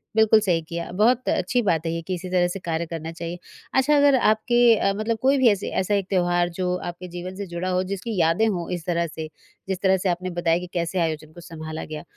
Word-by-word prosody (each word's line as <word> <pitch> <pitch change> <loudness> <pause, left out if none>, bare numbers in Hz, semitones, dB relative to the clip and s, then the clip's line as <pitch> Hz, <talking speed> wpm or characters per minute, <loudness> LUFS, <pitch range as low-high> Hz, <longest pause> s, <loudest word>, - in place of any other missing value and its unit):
बिल्कुल 220 0 +6
सही 180 -5 +1
किया, 170 0 -5
बहुत 230 +7 +2
अच्छी 215 +7 +1
बात 170 -7 0
है 165 - 0
ये 165 - -3
कि 185 +3 -4
इसी 180 +1 -7
तरह 180 -1 +2
से 175 +2 -5
कार्य 170 -2 -2
करना 165 0 -5
चाहिए। 170 +1 -6 0.3
अच्छा 270 +3 +3
अगर 285 -1 +5
आपके 235 0 +4
अ, 195 - +1
मतलब 220 +1 -1
कोई 270 +2 +4
भी 260 -3 +5
ऐसे 200 -1 -2
ऐसा 205 +2 0
एक 195 -2 -1
त्योहार 175 -2 +2
जो 180 -1 0
आपके 175 0 -7
जीवन 180 +1 -6
से 200 0 -6
जुड़ा 175 +1 -3
हो, 185 0 +1
जिसकी 200 +3 -4
यादें 165 +7 +3
हों 175 -5 -2
इस 170 -2 -8
तरह 170 -1 0
से, 160 0 -7 0.4
जिस 190 -2 -2
तरह 190 -1 +4
से 185 +1 -1
आपने 180 +1 -2
बताया 165 0 +2
कि 180 - -7
कैसे 175 +1 -1
आयोजन 155 -2 -2
को 175 - -12
सँभाला 160 -1 -6
गया? 155 -1 -7
180 Hz, 240 wpm, -24 LUFS, 170-205 Hz, 0.4 s, बिल्कुल